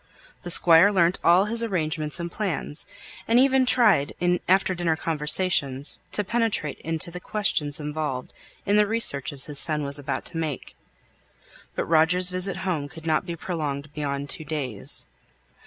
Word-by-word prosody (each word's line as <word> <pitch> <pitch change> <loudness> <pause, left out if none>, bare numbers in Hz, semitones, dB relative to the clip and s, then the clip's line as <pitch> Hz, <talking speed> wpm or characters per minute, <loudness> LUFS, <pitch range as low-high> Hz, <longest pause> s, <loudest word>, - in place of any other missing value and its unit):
The 175 - -8
Squire 170 +3 +5
learnt 175 -3 +2
all 175 +3 +4
his 230 +2 0
arrangements 160 -7 -2
and 170 0 -5
plans, 175 -7 -4 0.4
and 230 - +3
even 265 0 +3
tried 215 - +3
in 180 0 +1
after 190 0 +3
dinner 175 -2 -1
conversations 150 -3 0
to 210 - +2
penetrate 220 -8 -1
into 165 +1 -1
the 180 - -7
questions 160 -8 -1
involved 150 -4 -5 0.3
in 205 +1 +2
the 210 0 +3
researches 140 - +2
his 145 -2 +4
son 155 -2 +5
was 140 +1 +1
about 140 - -4
to - - -5
make. 155 -4 -5 1.0
But - - -2
Roger's 170 +3 +3
visit 185 +1 +1
home 155 -6 -2
could 165 +1 -13
not 160 +1 0
be 170 - -4
prolonged 150 -4 -5
beyond 140 -1 -3
two - - -3
days. 140 -9 -5
165 Hz, 155 wpm, -24 LUFS, 150-185 Hz, 1.0 s, Squire